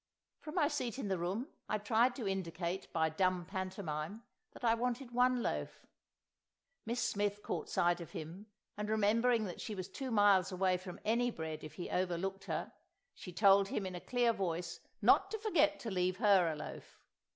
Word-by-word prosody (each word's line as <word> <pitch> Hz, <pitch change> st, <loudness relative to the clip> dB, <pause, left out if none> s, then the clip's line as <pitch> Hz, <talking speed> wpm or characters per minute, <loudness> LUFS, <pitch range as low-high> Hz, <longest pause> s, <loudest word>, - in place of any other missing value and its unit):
From 305 Hz, -, -8 dB
my 295 Hz, -, +4 dB
seat 260 Hz, -6 st, -2 dB
in 235 Hz, -7 st, -3 dB
the 190 Hz, -2 st, 0 dB
room 195 Hz, +10 st, -2 dB, 0.2 s
I 215 Hz, -, +1 dB
tried 230 Hz, +4 st, +2 dB
to 235 Hz, -7 st, -4 dB
indicate, 185 Hz, -1 st, -3 dB
by 160 Hz, -1 st, +2 dB
dumb 180 Hz, +2 st, +1 dB
pantomime, 185 Hz, 0 st, -4 dB, 0.3 s
that -, -, -14 dB
I 230 Hz, -1 st, +4 dB
wanted 245 Hz, +2 st, -2 dB
one 250 Hz, 0 st, +3 dB
loaf; -, -, -3 dB, 1.0 s
Miss 235 Hz, +2 st, -1 dB
Smith 205 Hz, 0 st, -1 dB
caught 165 Hz, -, -3 dB
sight 175 Hz, 0 st, +2 dB
of 170 Hz, -, -8 dB
him, 170 Hz, +7 st, -8 dB, 0.3 s
and 210 Hz, 0 st, -4 dB
remembering 220 Hz, +2 st, +3 dB
that 180 Hz, -, -6 dB
she 215 Hz, -, -4 dB
was 185 Hz, -2 st, -5 dB
two 260 Hz, +7 st, -5 dB
miles 205 Hz, -4 st, +4 dB
away 185 Hz, 0 st, +2 dB
from 180 Hz, -1 st, -9 dB
any 235 Hz, +3 st, +2 dB
bread 160 Hz, -7 st, -5 dB
if 155 Hz, -, -8 dB
he 175 Hz, -, -5 dB
overlooked 185 Hz, +2 st, -1 dB
her, -, -, -3 dB, 0.4 s
she 180 Hz, -, -9 dB
told 195 Hz, +1 st, +5 dB
him 200 Hz, 0 st, -2 dB
in 185 Hz, -, -4 dB
a 175 Hz, -, -6 dB
clear 245 Hz, -2 st, +2 dB
voice 175 Hz, -4 st, -3 dB, 0.2 s
not 390 Hz, -, +5 dB
to 440 Hz, -, -3 dB
forget 405 Hz, -8 st, +2 dB
to 225 Hz, -, -4 dB
leave 185 Hz, 0 st, 0 dB
her 195 Hz, -6 st, +5 dB
a -, -, -4 dB
loaf. 150 Hz, -, -9 dB
195 Hz, 185 wpm, -35 LUFS, 180-230 Hz, 1.0 s, told